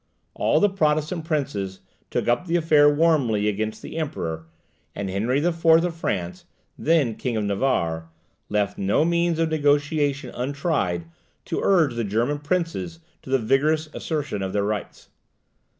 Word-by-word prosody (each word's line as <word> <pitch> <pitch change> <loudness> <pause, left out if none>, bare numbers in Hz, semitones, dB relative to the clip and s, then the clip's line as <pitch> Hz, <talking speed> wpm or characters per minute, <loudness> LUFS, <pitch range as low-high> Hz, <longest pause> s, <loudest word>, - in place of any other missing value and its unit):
All - - +2
the 205 - +5
Protestant 155 -3 0
princes 130 - -2 0.3
took - - -2
up 120 +9 +1
the 170 - 0
affair 155 -3 +5
warmly 145 -10 +2
against 110 +1 -2
the - - -7
Emperor; 80 - -4 0.5
and 100 -2 -3
Henry 125 - 0
IV. 165 -1 -1
of 165 +1 +4
France, 90 - -3 0.3
then 155 -8 +2
King 120 +1 -3
of 110 - 0
Navarre, 95 -7 0 0.4
left 100 -1 -1
no 100 +10 +2
means 170 -1 +1
of 165 0 +1
negotiation 145 -2 +1
untried 130 - -1 0.4
to - - -2
urge 165 -9 +3
the 115 0 -2
German 115 +8 0
princes 170 +2 -2 0.2
to - - -13
the 135 - +3
vigorous 150 +6 +1
assertion 145 - -3
of 95 -1 -3
their 100 -1 +1
rights. 105 0 -4
145 Hz, 150 wpm, -24 LUFS, 105-160 Hz, 0.5 s, the